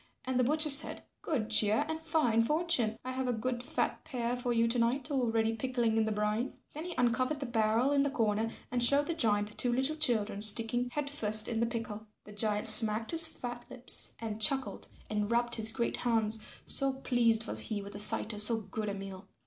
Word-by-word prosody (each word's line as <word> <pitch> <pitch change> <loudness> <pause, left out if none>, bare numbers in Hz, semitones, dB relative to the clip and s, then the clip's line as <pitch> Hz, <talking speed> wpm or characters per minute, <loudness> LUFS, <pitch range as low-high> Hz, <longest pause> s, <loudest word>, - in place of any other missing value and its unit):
And 255 0 -2
the - - +3
butcher 305 +4 +3
said, 280 +3 +7 0.2
"Good 230 -8 -3
cheer 215 +5 +4
and 315 0 -4
fine 310 -8 0
fortune. 255 -5 0
I 255 - -4
have 260 0 -4
a 245 - 0
good 240 +2 -4
fat 245 - -3
pair 245 -5 -3
for 245 0 -4
you 230 0 +1
to 235 +1 0
night 250 +5 -1
already 225 -4 0
pickling 240 -1 -2
in 225 -1 +1
the 220 - -2
brine." 210 +3 -2 0.2
Then 310 +3 -7
he 355 - -7
uncovered 255 +4 0
the 275 - -5
barrel 230 +2 0
in 285 -1 +2
the 285 - 0
corner 225 -3 -1 0.2
and 245 -1 -1
showed 280 +4 +3
the 335 - -3
giant 210 -9 0
the - - -14
two 245 - 0
little 265 +5 0
children 220 -9 -1
sticking 230 +3 +4
head 295 +2 -4
first 220 -6 0
in 225 -2 -3
the 235 - 0
pickle. 220 -2 -7 0.2
The 210 - -13
giant 210 0 -2
smacked 220 0 +4
his 330 -1 +4
fat 245 -5 -7
lips 250 0 -2
and 220 -1 -7
chuckled 265 +4 0 0.2
and 210 -1 -3
rubbed 235 0 0
his 220 -1 +3
great 235 +1 -3
hands, 225 -2 0 0.3
so 275 -1 +1
pleased 235 -4 0
was - - -4
he 210 -3 -4
with 200 +1 -10
the 205 - -7
sight 210 +1 +4
of 210 - -2
so 225 +1 +3
good 215 0 -6
a 200 - -5
meal. 195 0 -9
235 Hz, 220 wpm, -30 LUFS, 220-260 Hz, 0.3 s, said